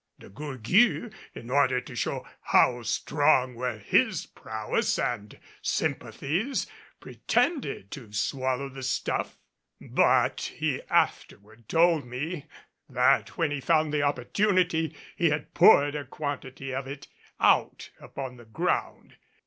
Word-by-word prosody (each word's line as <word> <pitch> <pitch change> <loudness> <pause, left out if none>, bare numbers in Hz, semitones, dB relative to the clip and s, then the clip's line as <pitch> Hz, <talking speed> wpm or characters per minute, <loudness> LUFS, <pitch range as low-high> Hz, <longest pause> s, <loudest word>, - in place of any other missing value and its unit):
De - - -14
Gourgues, 150 - +1 0.2
in 120 - -9
order 130 -2 +3
to 125 0 -10
show - - -2 0.2
how 125 -1 +4
strong 130 +2 +2
were 120 -1 -3
his 105 - +1
prowess 110 -1 -2
and 105 -3 -3 0.2
sympathies, 190 - -1 0.3
pretended 270 - -1
to 120 -7 -9
swallow 130 +5 -1
the 135 0 -9
stuff; 130 - -2 0.4
but - - +1
he - - -1
afterward 110 +2 -1
told 165 -2 +4
me 150 +5 -5 0.4
that 125 -1 +2
when 165 -4 +1
he 145 -2 -3
found 155 +2 +2
the 150 - +1
opportunity 165 - +1 0.2
he 170 -2 +2
had 150 0 -3
poured 145 0 +6
a 150 -1 -3
quantity 135 -1 -5
of 135 0 -3
it 140 +1 -8 0.3
out - - +2
upon 130 -2 -7
the 120 - -14
ground. 110 - -2
135 Hz, 125 wpm, -27 LUFS, 125-155 Hz, 0.4 s, poured